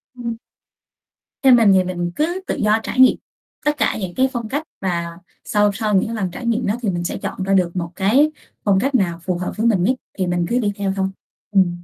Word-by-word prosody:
Ừm. 235 -2 -4 1.1
Theo 265 -2 +7
mình 225 -4 +6
thì 190 -1 +4
mình 175 -1 -3
cứ 345 +5 0
tự - - -1
do 215 +1 +2
trải - - -4
nghiệm 260 -1 +7 0.5
tất 295 0 +1
cả - - +1
những 185 -3 -5
cái 260 +1 +3
phong 235 -3 -4
cách 290 +5 -2 0.2
và 175 -3 -1 0.4
sau 210 -1 +2
sau 210 -1 0
những 220 +4 +1
lần 190 -5 -2
trải 235 - -7
nghiệm 235 +1 0
đó 205 - +1
thì 215 - 0
mình 175 -2 -2
sẽ - - -3
chọn 190 - -4
ra 195 +1 0
được 180 -2 +2
một 170 -2 -3
cái 255 +11 +3 0.3
phong 195 -2 +3
cách 270 +5 0
nào 170 -6 +1
phù 180 -2 -1
hợp 180 - -3
với 225 - 0
mình 195 -6 +2
nhất 255 +7 +2 0.2
thì 185 - 0
mình 175 -1 0
cứ 245 +1 +2
đi 210 -3 0
theo 200 -2 -1
thôi. 190 -1 0 0.4
Ừm. 175 -3 +2
200 Hz, 240 wpm, -20 LUFS, 185-235 Hz, 1.1 s, Theo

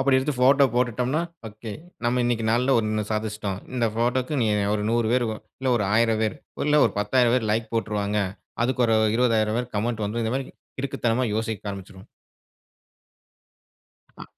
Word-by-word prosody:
அப்டி 135 0 +4
எடுத்து 140 +3 -1
photo 140 +2 +6
போட்டுட்டோம்னா 125 +4 +1 0.3
okay, 110 +1 -8 0.3
நம்ம 125 +1 +2
இன்னிக்கு 120 -2 0
நாள்ல 125 +4 +3
ஒண்ணு 110 -1 -1
சாதிச்சுட்டோம். 105 -2 -3 0.2
இந்த 120 -2 +1
போட்டோக்கு 125 +5 0
இனி 115 -3 +2 0.3
ஒரு 105 - -1
100 115 -1 +1
பேரு, 125 -2 +2 0.3
இல்ல 135 - -1
ஒரு 105 - 0
1000 115 -1 +3
பேரு, 110 - -1 0.3
இல்ல 150 0 +5
ஒரு - - -3
10000 120 +3 +3
பேரு 110 -4 0
லைக் 110 0 -2
போட்ருவாங்க. 105 -2 -1 0.5
அதுக்கு 125 0 +1
ஒரு 115 -1 +3 0.2
20000 115 -3 +2
பேரு 125 0 -3
கமெண்ட் 110 0 -1
வந்து 115 +3 -2
இந்த 110 - -1
மாறிக்கு 135 -1 -4 0.2
கிறுக்குத்தனமா 130 -2 0
யோசிக்க 110 -2 -3
ஆரம்பிச்சுருவோம். 95 -1 -10 2.1
அ. - - -9
115 Hz, 160 wpm, -24 LUFS, 110-125 Hz, 2.1 s, photo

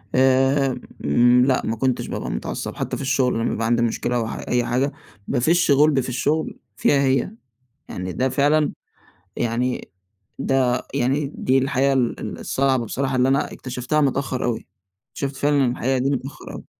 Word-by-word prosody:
آمم 130 - +3
لأ 130 -1 +2
ما 115 - -1
كنتش 130 +2 -1
بابقى - - -4
متعصب، - - -4
حتى - - -3
في - - -6
الشغل 130 -1 +1
لمّا 115 0 0
بيبقى 115 - -2
عندي 120 +1 +2
مشكلة 120 +1 -1
أو 115 -2 0
ح - - -5
أي 125 -1 +1
حاجة، 125 +4 0 0.4
بافشّ 155 +6 +2
غُلبي 140 0 +4
في 130 - -5
الشغل 145 +6 -1 0.2
فيها 140 +4 +3
هي. 135 +5 +1 0.6
يعني 90 0 -5
ده 130 +1 0
فعلًا 145 +3 +2 0.7
يعني 120 +2 -1 0.5
ده 130 -2 +1
يعني 140 +2 0
دي 130 +1 +2
الحقيقة 135 +1 +1
ال 125 -3 0
ال - - -6
الصعبة 130 -2 0
بصراحة 130 +4 -2
اللي 125 +1 +3
أنا 135 +1 +1
اكتشفتها 125 +4 -2
متأخر 135 -2 0
أوي. 120 -2 -2 0.4
اكتشفت 140 -1 -4
فعلًا 145 -1 +2
الحقيقة 125 +2 0
دي 130 +2 0
متأخر 135 0 -5
أوي. - - -9
130 Hz, 165 wpm, -22 LUFS, 125-140 Hz, 0.7 s, غُلبي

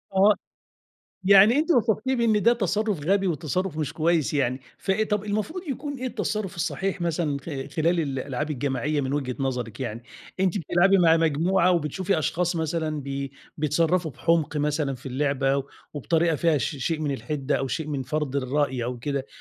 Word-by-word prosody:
آه. 200 +2 +6 0.9
يعني 200 +6 +7
أنتِ 320 +3 0
وصفتيه 240 0 +2
بإن 220 -4 +2
ده 235 - +6
تصرُّف 210 -4 0
غبي 195 0 +2
وتصرُّف 170 +1 -2
مش 150 -1 -2
كويس 160 -1 +1
يعني، 130 -2 0 0.2
فإيه 200 +2 0
طب 210 0 0
المفروض 215 - -2
يكون 285 +2 -4
إيه 255 - -3
التصرُّف 210 -6 -3
الصحيح 185 +3 -2
مثلًا 165 -3 0
خ - - -22 0.3
خلال 170 +2 +2
الألعاب 140 0 -3
الجماعية، 145 +2 -1
من 135 0 -2
وجهة 135 -4 -2
نظرِك 125 -4 -3
يعني؟ 115 -2 -4 0.4
أنتِ 190 +1 +2
بتلعبي 180 +4 +3
مع 165 -2 +5
مجموعة 165 +4 +2
وبتشوفي 175 +2 0
أشخاص 175 +2 0
مثلًا 160 -1 -1
بي 140 0 -4 0.3
بيتصرّفوا 160 +3 +1
بحُمق 160 +2 0
مثلًا 150 -1 0
في 130 +2 -12
اللعبة 135 0 0 0.3
وبطريقة 165 +3 +1
فيها 160 -1 +2
ش 145 - -2
شيء 155 +4 -2
من 150 -2 -1
الحِدّة 135 +3 -2
أو 135 - -2
شيء 155 +5 -3
من 140 -3 -2
فَرْض 150 0 -2
الرأي 130 -2 0
أو 125 0 -4
كده 140 +2 -3
155 Hz, 165 wpm, -25 LUFS, 140-190 Hz, 0.9 s, يعني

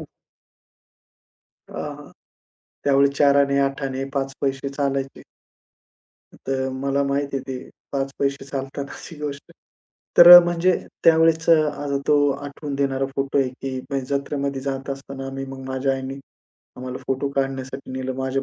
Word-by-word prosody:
हं. - - -7 1.6
अ, - - -13
हां. 145 -1 -7 0.7
त्यावेळी 140 0 +4
चाराने, 140 -1 +4
आठाने, 135 -1 -3
5 135 0 -2
पैसे 135 0 -1
चालायचे. 135 -1 -3 1.2
तर 130 0 -1
मला 135 +1 0
माहिती 140 0 -1
आहे 135 - -4
ते 130 -1 -6 0.2
5 135 -1 -1
पैसे 140 0 -1
चालतानाची 140 +3 -6
गोष्ट. 145 -1 -6 0.7
तर 175 - +11
अ, - - +13
म्हणजे 175 +1 +2 0.3
त्यावेळेसचं 160 -1 +5
अ, 145 -1 -3
तो 145 -1 +4
आठवून 140 +1 -5
देणारा 135 -1 0
फोटो 135 0 0
आहे, 135 -2 +2
की 130 +1 -6
म्हणजे 135 -1 -1
जत्रेमध्ये 140 -1 -3
जात 135 0 -4
असताना 135 0 -6
आम्ही 135 0 -5
मग 135 0 -8
माझ्या 130 +1 0
आईनी, 135 0 -5 0.6
आम्हाला 125 0 -6
फोटो 135 +1 0
काढण्यासाठी 135 0 -3
नेलं. 130 0 -3
माझ्या 130 +1 -1
140 Hz, 135 wpm, -22 LUFS, 135-140 Hz, 1.6 s, अ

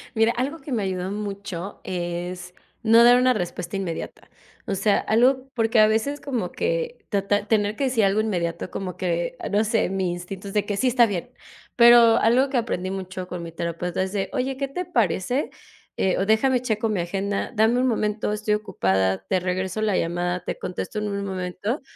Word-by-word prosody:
Mira, 225 +1 +4
algo 260 +7 -2
que 275 0 -9
me 225 -4 0
ayudó 185 0 -2
mucho 200 -2 -5
es 175 0 -4 0.3
no 230 +1 +6
dar 245 +1 +7
una 255 0 +4
respuesta 180 -1 -4
inmediata. 180 -4 -5 0.4
O 200 - -2
sea, 200 +2 +2
algo 255 +4 +2
porque, 225 -1 +2
a 215 - +7
veces, 225 +7 0
como 235 -11 -3
que - - -2
tratar 205 0 0
tener 210 -1 +1
que 275 - -1
decir 235 -5 +2
algo 200 +2 +2
inmediato, 175 -5 -2
como 185 -3 -5
que 180 +7 -1 0.2
no 205 +1 +3
sé, 220 -3 +1
mi 190 -2 -1
instinto 180 +3 -7
es 205 0 0
que 205 -1 -2
sí, 255 - +1
está 245 -1 +5
bien, 195 -6 -4 0.5
pero 235 -1 +7
algo 255 +4 +3
que 265 - 0
aprendí 185 -6 -2
mucho 190 -1 -5
con 180 -1 -6
mi 165 - -7
terapeuta 170 +2 -3
es 190 +1 -2
de: 195 -2 -1
"Oye, 265 0 -1
¿qué 275 0 -2
te 360 +7 -4
parece? 240 - 0 0.5
Eh, 190 - +1
o 195 - +1
déjame 245 +4 +3
checo 225 -2 -1
mi 205 -5 0
agenda, 195 +3 -2
dame 225 +2 +3
un 255 - +2
momento, 215 -2 0
estoy 210 0 0
ocupada, 95 - 0
te 185 - +2
regreso 185 +2 -2
la 210 -3 +1
llamada, 175 +1 -1
te - - -4
contesto 200 +4 -4
en 210 0 -2
un 200 0 -3
momento", 190 - -3
205 Hz, 195 wpm, -24 LUFS, 180-235 Hz, 0.5 s, dar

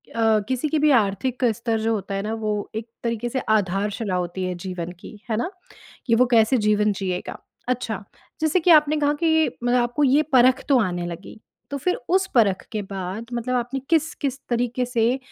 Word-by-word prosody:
अ, 225 -1 +3
किसी 260 +4 0
की 310 - +1
भी 300 +1 +4
आर्थिक 220 +6 -2
स्तर 230 0 -1
जो 225 +1 0
होता 200 -2 -3
है 195 - -1
ना, 215 - -3
वो 215 -2 -3
एक 220 +1 -4 0.2
तरीके 235 0 -2
से 260 - -2 0.2
आधारशिला 200 +1 -2
होती 180 +1 -3
है 185 - -2
जीवन 180 -2 -5
की, - - -11
है 220 - +1
ना? 340 - -1 0.6
कि 230 - +3
वो 250 +2 +4
कैसे 230 +2 +5
जीवन 210 0 +3
जिएगा। 185 -2 -4 0.3
अच्छा, 230 -5 -2 0.4
जैसे 315 +3 +2
कि 350 - +3
आपने 305 -1 +6
कहा 290 -1 +2
कि 320 -1 +4 0.2
मतलब 245 +1 +3
आपको 245 +5 0
ये 280 +3 +4
परख 255 +1 +5
तो 275 -3 +5
आने 175 -4 -1
लगी, 175 +5 -9 0.3
तो 285 - -3
फिर 360 +7 0
उस 380 +2 +2
परख 205 -6 +3
के 215 - -2
बाद 195 +2 -6
मतलब 240 +1 -2
आपने 245 +2 -2
किस-किस 300 -4 0
तरीके 245 +1 0
से 240 +1 +1
230 Hz, 195 wpm, -23 LUFS, 205-265 Hz, 0.6 s, आपने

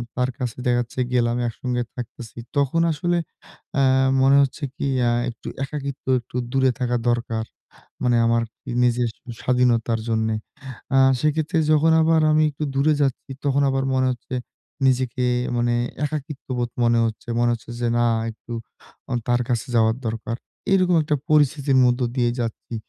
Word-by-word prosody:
তার 125 0 +1
কাছে 125 -4 -3
দেখা 120 0 +3
যাচ্ছে 120 +2 -7
গেলাম 120 -1 +2
একসঙ্গে 125 +1 -2
থাকতেছি 120 -1 -8 0.2
তখন 140 +4 +2
আসলে 175 +3 0 0.6
আ - - +5 0.4
মনে 135 +1 +6
হচ্ছে 140 +3 -2
কী - - -2 0.4
একটু 115 - -10 0.2
একাকিত্ব 140 -1 -6 0.2
একটু 120 +1 -11 0.2
দূরে 130 -1 +3
থাকা 125 -1 0
দরকার। 115 -2 -1 0.6
মানে 120 -1 +3
আমার 115 0 +2 0.4
নিজের 120 0 +2 0.3
স্বাধীনতার 120 -2 +2
জন্যে। 110 -1 0 0.6
আ - - +5 0.2
সেক্ষেত্রে 155 +3 +1
যখন 155 +1 +4
আবার 160 0 +4
আমি 155 0 +4
একটু 150 +1 -5
দূরে 140 +3 +3
যাচ্ছি 135 0 -1
তখন 140 0 +2
আবার 135 0 0
মনে 130 0 +2
হচ্ছে 125 +1 -8 0.5
নিজেকে 125 -1 +1 0.3
মানে 120 0 +1 0.3
একাকিত্ববোধ 135 -4 -4
মনে 115 0 +3
হচ্ছে। 110 +1 -6
মনে 120 - +3
হচ্ছে 115 0 -10
যে 120 - +1
না 120 - +3 0.3
একটু 115 +2 -11 0.8
তার 120 0 +3
কাছে 120 -1 -1
যাওয়ার 110 0 +3
দরকার। 115 +1 -3 0.4
এরকম 185 -2 +4
একটা 150 0 0
পরিস্থিতির 145 -2 +3
মধ্য 125 +1 +2 0.2
দিয়ে 120 -2 +2
যাচ্ছি। 115 0 -5
125 Hz, 145 wpm, -23 LUFS, 120-140 Hz, 0.8 s, মনে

